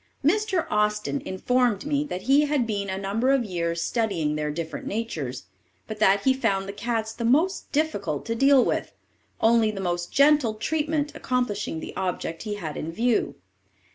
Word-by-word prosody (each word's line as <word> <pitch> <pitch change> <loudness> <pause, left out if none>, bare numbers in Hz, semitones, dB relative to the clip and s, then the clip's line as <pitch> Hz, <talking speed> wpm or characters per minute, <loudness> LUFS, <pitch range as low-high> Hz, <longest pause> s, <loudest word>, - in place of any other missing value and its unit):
Mr. 385 +1 +2
Austin 210 +6 0
informed 240 +3 +1
me 295 -1 +1
that 185 -11 -5
he 280 +3 +4
had 285 -4 +1
been 200 -3 -2
a 190 - -2
number 200 +6 0
of 270 -3 +3
years 170 -3 -2
studying 195 -10 0
their 150 0 -2
different 160 +1 -5
natures, 160 - -4 0.4
but 215 -1 -7
that 200 -1 +4
he 265 - +4
found 195 -7 0
the 200 - -5
cats 225 0 -2
the 235 - -5
most 315 +11 +1
difficult 205 - -1
to 230 - -1
deal 270 +2 +5
with, - - -2 0.5
only 225 -1 +4
the 210 -2 -5
most 175 -2 -2
gentle 280 -5 +4
treatment 300 +4 -1
accomplishing 210 -9 -2
the - - -8
object 175 -3 -3
he 210 -2 -4
had 160 -7 -5
in 160 - -4
view. 230 +5 0
220 Hz, 170 wpm, -25 LUFS, 190-270 Hz, 0.5 s, deal